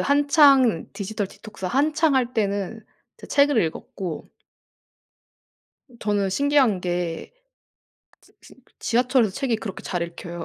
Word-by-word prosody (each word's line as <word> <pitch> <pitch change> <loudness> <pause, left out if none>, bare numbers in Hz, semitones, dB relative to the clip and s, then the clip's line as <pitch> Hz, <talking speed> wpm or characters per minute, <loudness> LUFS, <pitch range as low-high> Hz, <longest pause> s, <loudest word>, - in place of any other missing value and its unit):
한창 280 - +4
디지털 205 0 -4
디톡스 200 -3 -9
한창 300 - +2
할 250 -2 +1
때는 205 0 -2 0.3
이제 - - -11
책을 280 -5 +3
읽었고 165 +1 -6 1.7
저는 205 -2 0
신기한 275 -4 +2
게 175 - -3 0.9
지 - - -24
지 - - -16 0.2
지하철에서 245 -3 +1
책이 260 -5 -1
그렇게 210 -3 -7
잘 175 -2 -3
읽혀요. 170 0 -7
220 Hz, 240 characters per minute, -23 LUFS, 185-275 Hz, 1.7 s, 한창